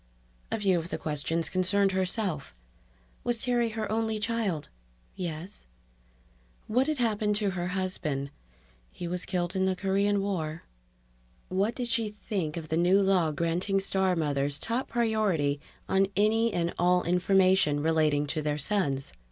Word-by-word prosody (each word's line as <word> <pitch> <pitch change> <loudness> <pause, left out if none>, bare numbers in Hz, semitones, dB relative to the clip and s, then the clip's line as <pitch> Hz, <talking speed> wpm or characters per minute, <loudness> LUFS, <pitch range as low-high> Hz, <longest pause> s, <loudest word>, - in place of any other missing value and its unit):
A - - 0
few 190 -4 +3
of 165 +1 -6
the - - -3
questions 160 +2 -2
concerned 190 +2 +2
herself: 185 - -1 0.7
Was 240 -1 0
Terry 240 -2 +2
her 220 -1 -4
only 220 0 0
child? 210 -7 -1 0.5
("Yes.") 175 - -6 1.0
What 255 +5 +1
had 310 -1 0
happened 215 -3 +1
to 205 -2 +1
her 175 -1 -3
husband? 155 -7 -2 0.6
("He 175 - -6
was 180 +1 -3
killed 175 0 -1
in 190 0 +2
the 190 0 +1
Korean 200 +2 +1
War.") 165 -5 -3 0.9
What 200 +5 0
did 245 -2 -2
she 230 -3 +1
think 195 -6 -4
of 160 -2 -6
the 160 - 0
new 180 +3 +4
law 190 -5 +3
granting 170 +6 0
star 190 -1 +1
mothers 145 -3 0
top 235 +4 -1
priority 210 -12 +1 0.3
on 190 0 +3
any 225 +2 +3
and 170 -2 -1
all 180 0 +3
information 185 -3 +3
relating 155 -2 +2
to 155 +2 -2
their 150 0 -1
sons? 140 - 0
185 Hz, 150 wpm, -28 LUFS, 160-210 Hz, 1.0 s, new